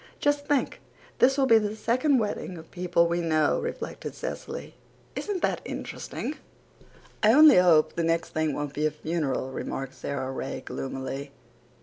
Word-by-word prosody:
"Just 290 0 +1
think, 290 -2 0 0.4
this 265 +2 +5
will 275 - +4
be 230 -3 +6
the 210 0 -2
second 255 +6 +2
wedding 205 -5 -2
of 160 0 -12
people 175 -1 +2
we 170 +1 0
know," 155 -3 +2
reflected 475 +1 -5
Cecily. - - -6 0.4
"Isn't 400 -4 -3
that - - +1
interesting?" - - -5 0.8
"I 215 +1 +6
only 305 -1 +8
hope 170 -4 +5
the 170 - -1
next 165 0 0
thing 155 -3 -1
won't 145 -1 -4
be 150 +1 +1
a - - +1
funeral," 150 -4 -2
remarked 135 0 -4
Sara 135 -2 -4
Ray 135 0 -4
gloomily. 135 +1 -5
170 Hz, 155 wpm, -27 LUFS, 150-250 Hz, 0.8 s, only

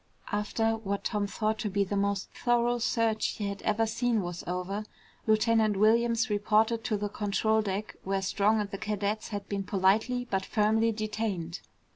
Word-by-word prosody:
After 225 +2 0
what 200 -2 -3
Tom 205 -2 -1
thought 215 +1 -1
to 210 - -1
be 200 +1 +1
the 200 +1 -3
most 200 -1 -1
thorough 240 0 +1
search 225 -1 +1
he 205 - -2
had 200 0 -6
ever 215 +1 +1
seen 225 -1 0
was 175 0 -5
over, 180 +4 -3 0.4
Lieutenant 220 -1 +3
Williams 230 +3 +3
reported 215 +2 +2
to 215 - 0
the 205 +1 -2
control 215 +2 +1
deck 205 0 -3
where 195 0 -1
Strong 210 +3 +2
and 205 -1 -5
the 195 - -5
cadets 210 0 -2
had 205 -2 -5
been 200 -1 -2
politely 210 +6 +2
but 190 -1 +1
firmly 220 +3 +2
detained. 210 -6 -3
215 Hz, 170 wpm, -29 LUFS, 200-225 Hz, 0.4 s, Lieutenant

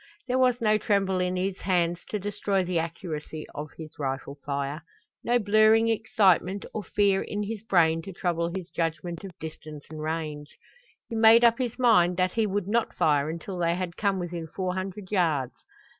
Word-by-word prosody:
There 255 +1 +1
was 250 -1 +3
no 215 -1 +3
tremble 195 -3 +1
in 180 0 0
his 185 +1 -2
hands 175 -2 0
to 210 - -1
destroy 200 -1 -1
the 180 -1 0
accuracy 160 -2 -5
of 150 +1 -6
his 155 -2 -10
rifle 135 0 -3
fire, 140 +2 -3 0.4
no 240 +1 +3
blurring 215 +1 +4
excitement 200 -3 +2
or 215 - -3
fear 195 +1 +2
in 210 0 -3
his 215 0 -5
brain 165 -6 +3
to 195 - -8
trouble 170 -1 -1
his 185 -1 -6
judgment 165 +1 -3
of 190 -3 -9
distance 155 -2 -9
and 155 -1 -7
range. 155 -2 -4 0.5
He - - -8
made 225 +1 +7
up 235 0 +5
his 245 -2 -2
mind 180 -9 +4
that 185 -1 +2
he 225 +1 +1
would 200 -1 -2
not 230 +3 0
fire 145 -1 +2
until 170 +3 -5
they 170 0 +1
had 180 -1 -4
come 200 -2 0
within 175 -2 -4
four 180 +3 -3
hundred 190 +1 -5
yards. 160 -10 +1
185 Hz, 185 wpm, -27 LUFS, 165-205 Hz, 0.5 s, made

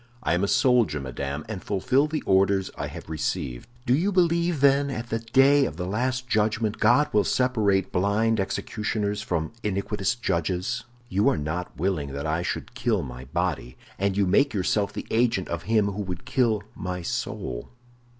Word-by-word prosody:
"I - - +1
am 90 +3 +1
a - - +2
soldier, 120 - +3
madame, 70 +2 -4
and 105 -4 -6
fulfill 130 +9 +2
the 155 0 -3
orders 95 0 +2
I - - -4
have - - -9
received." 70 - -3 0.2
"Do 120 - +3
you 175 +9 +2
believe, 170 -3 +2
then, 140 +1 +4
that 135 - -3
at 115 +1 -6
the 115 - 0
day 135 +5 +4
of 75 - -5
the 90 - -3
Last 125 +6 -1
Judgment 110 -1 0
God 125 +7 +4
will 105 -1 +4
separate 105 -7 +1
blind 105 +4 +2
executioners 105 +1 -2
from 85 -3 -2
iniquitous 105 +2 -1
judges? 95 +3 -1 0.2
You 100 +1 +2
are - - +1
not 80 +1 -4
willing 75 -5 -1
that 70 +1 -4
I 80 +2 0
should - - -4
kill - - 0
my 65 +1 -8
body, 75 -5 -2 0.2
and 100 0 0
you 100 - +3
make 140 +8 +3
yourself 100 +2 +1
the - - -6
agent 115 -5 +2
of 85 0 -4
him 105 -3 +3
who 100 +2 -4
would 90 -3 -5
kill 115 -5 +1
my 90 -1 -4
soul." 60 -6 -4
100 Hz, 180 wpm, -25 LUFS, 90-120 Hz, 0.2 s, then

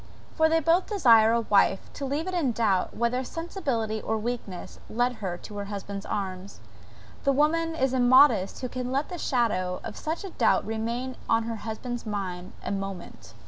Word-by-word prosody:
for 320 -1 +3
they 325 0 +3
both 330 +4 +2
desire 230 - +5
a 235 0 +2
wife 200 -3 +2
to 280 - -5
leave 290 +4 -1
it 370 - -3
in 320 -8 +1
doubt, 210 -5 0
whether 235 +2 +1
sensibility 255 - -3
or 220 - -1
weakness 220 -5 -5
led 245 +1 0
her 180 -3 -3
to 205 +3 -10
her 200 - -3
husband's 200 0 -6
arms. 195 -1 -4 0.6
The 275 - +3
woman 325 +4 +2
is 265 -4 +1
immodest 250 -5 +5
who 255 - -2
can 250 0 -4
let 275 +3 0
the 355 -2 -6
shadow 195 -10 0
of - - -6
such 320 +4 -4
a 390 - -6
doubt - - +2
remain 235 +4 -3
on 225 0 +3
her 225 0 -4
husband's 230 +2 -5
mind 185 -3 -4
a - - -2
moment. 195 -3 -6
235 Hz, 185 wpm, -27 LUFS, 205-275 Hz, 0.6 s, desire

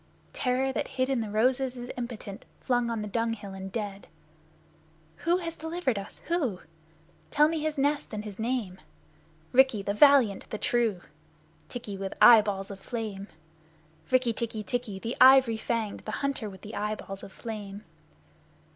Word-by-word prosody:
Terror 260 +1 0
that - - -2
hid 255 +1 +1
in 265 -3 +1
the 220 - -4
roses 250 +4 +1
is 245 0 -6
impotent 235 -5 -6 0.2
flung 245 -2 +1
on 225 -2 -2
the - - -4
dung 230 +2 0
hill 205 -3 -8
and 190 0 -7
dead! 205 -2 -5 1.1
Who 345 +1 +2
has 335 -2 -5
delivered 320 - -2
us, 195 - -10
who? 280 - -1 0.7
Tell 300 0 +5
me 320 0 -1
his 310 0 -2
nest 290 +2 0
and 215 -1 -5
his 205 -1 -8
name. 220 -6 -2 0.7
Rikki, 260 -5 +4
the 200 - -1
valiant, 255 -5 +5
the 215 - -4
true, 225 -5 +1 0.7
Tikki, 220 -5 -6
with 195 0 -5
eyeballs 205 -4 +6
of 195 - -8
flame, 210 -3 -5 0.8
Rikk 255 -3 +2
tikki 220 -2 -3
tikki, 225 -1 -3
the 230 +5 -4
ivory 260 -3 +7
fanged, 220 -2 -2
the 215 - -7
hunter 265 -6 -2
with 190 0 -12
eyeballs 205 -1 -4
of - - -10
flame! 210 -1 -7
230 Hz, 155 wpm, -28 LUFS, 205-260 Hz, 1.1 s, ivory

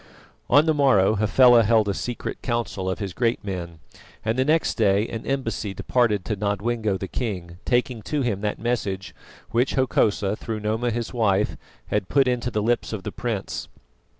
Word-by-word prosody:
On 145 +4 +6
the 160 - +3
morrow 130 -10 +4
Hafela 120 +3 +6
held 110 -1 +3
a 100 - +1
secret 120 +4 -5
council 115 -6 -2
of 95 - -2
his 100 -4 -5
great 115 +4 0
men, 90 -4 -5 0.5
and 110 +1 +1
the 130 - +2
next 155 +4 +2
day 105 -1 +2
an 115 -1 -6
embassy 115 -7 -2
departed 105 -7 +1
to 110 - -1
Nodwengo 105 +1 -1
the 95 - -5
king, 90 -7 -4
taking 125 -1 0
to 145 +5 -2
him 105 -5 -1
that 105 -1 -1
message 105 -5 -2 0.4
which 120 +3 +1
Hokosa, 110 -6 +1
through 110 0 -5
Noma 110 +3 0
his 115 +1 -3
wife, 105 -4 +1 0.3
had 105 -3 -1
put 135 -2 +3
into 125 -1 0
the 105 -3 -1
lips 120 0 0
of 100 -3 -4
the - - -4
prince. 115 -5 -4
110 Hz, 180 wpm, -24 LUFS, 100-120 Hz, 0.5 s, On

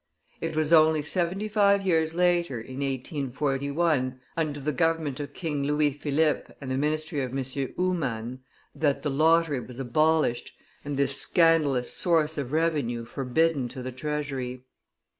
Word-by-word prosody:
It 165 -1 -3
was 155 +1 +1
only 155 -1 +5
seventy 180 +6 0
five 200 -2 +3
years 160 -3 +1
later, 175 -4 +2
in 130 +3 -9
1841, 140 +1 -1 0.2
under 155 -3 -2
the 145 +2 -1
government 160 -4 0
of 145 0 -6
King 150 -5 -3
Louis 150 +1 +2
Philippe 150 +2 0
and 135 -2 -6
the - - 0
ministry 155 +1 -1
of 130 0 -3
M. 135 - -1 0.3
Humann, 130 -10 -2 0.3
that 145 -3 0
the 145 - -1
lottery 160 0 +3
was 125 +1 -9
abolished, 155 0 +1 0.3
and 145 -1 -4
this 140 0 +3
scandalous 155 -7 +3
source 160 -3 +1
of 135 -2 -4
revenue 150 -8 0
forbidden 135 +3 0
to 130 +1 -8
the 130 - -4
treasury. 130 -2 -4
150 Hz, 145 wpm, -27 LUFS, 135-165 Hz, 0.3 s, only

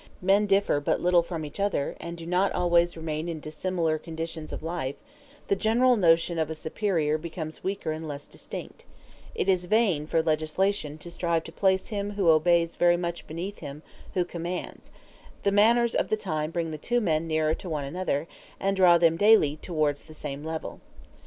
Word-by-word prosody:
When, - - -23
on - - -22
the - - -29
contrary, 195 +2 +3
men 210 - +1 0.3
differ - - +1
but 145 - 0
little 175 -1 +4
from 165 -2 -5
each 150 +6 -9
other, 200 -8 0
and 170 0 -6
do 165 - -8
not 180 +3 +2
always 175 -1 +2
remain 160 +1 -3
in 165 -2 -4
dissimilar 160 +1 -1
conditions 165 -1 -6
of - - -6
life, 160 -5 -3 0.5
the 200 - +2
general 240 +5 +3
notion 170 -3 +3
of 160 -1 0
a 160 - -4
superior 160 -2 0
becomes 160 -1 -6
weaker 195 -4 -2
and 160 +1 -5
less 145 -1 -6
distinct: - - -9 0.5
it - - -1
is 185 -2 +2
vain 185 -7 +2
for 160 0 +1
legislation 155 +1 0
to 170 +3 -10
strive 170 -1 0
to 165 - -10
place 190 +1 +1
him 205 -1 -3
who 195 -4 +2
obeys 170 +1 +3
very 175 0 +4
much 170 -1 -4
beneath 175 +6 -5
him 145 +2 -8 0.3
who 180 -2 +2
commands; 175 +1 -6 0.5
the 200 - +3
manners 230 +3 +4
of - - +1
the 215 - +1
time 155 -7 -2
bring 165 -1 -2
the 155 - -6
two 245 +9 +1
men 165 -6 0
nearer 155 -1 +1
to 180 - -7
one 150 -3 -2
another, 160 0 -2 0.3
and 195 0 0
draw 180 -2 +7
them 165 -1 +3
daily 205 -8 +5
towards 155 -3 -1
the 155 - -13
same 145 -1 -6
level. 160 0 -5
170 Hz, 200 wpm, -27 LUFS, 155-190 Hz, 0.5 s, draw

